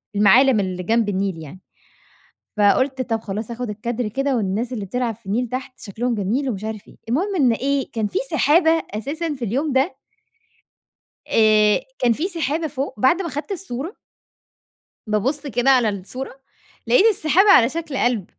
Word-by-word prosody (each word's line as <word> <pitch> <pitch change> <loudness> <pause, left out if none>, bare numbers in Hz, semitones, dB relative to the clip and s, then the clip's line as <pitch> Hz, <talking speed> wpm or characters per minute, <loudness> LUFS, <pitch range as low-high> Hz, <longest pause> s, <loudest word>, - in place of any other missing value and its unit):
المعالم 225 +5 +5
اللي 185 -2 -3
جنب 225 +2 +1
النيل 195 -3 -1
يعني. 155 +5 -11 1.0
فقلت: 260 +6 +2
"طب، 225 -3 -2
خلاص 215 +2 -5
آخد 240 -1 -5
الكادر 230 +3 -3
كده 270 +5 -1
والناس 220 +4 -2
اللي 210 -5 -4
بتلعب 235 +2 -2
في 215 - -30
النيل 235 +5 -1
تحت 255 +1 -6
شكلهم 230 +4 -3
جميل 230 +8 -1
ومش 205 -4 -4
عارف 220 -2 -6
إيه." - - -16
المهم 370 - 0
إن 260 -9 +3
إيه، 275 +3 -1
كان 220 -2 -1
في 380 - -2
سحابة 320 +2 +4 0.2
أساسًا 300 +8 -3
في 255 -3 -4
اليوم 270 +7 -1
ده 270 +7 +1 1.3
آآ، 215 -1 +4 0.2
كان 240 -2 +3
في 315 - -2
سحابة 320 -3 -2
فوق، 275 -7 -5
بعد 340 +9 +3
ما 335 - -4
أخدت 295 +6 -5
الصورة. 340 - -5 1.1
بابُص 255 +8 -1
كده 260 0 +1
على 250 -4 +4
الصورة، 250 +7 -6 0.5
لقيت 250 - +4
السحابة 385 -1 +4
على 230 - +7
شكل 320 -2 -5
قلب. 240 -7 0
245 Hz, 165 wpm, -21 LUFS, 215-280 Hz, 1.3 s, على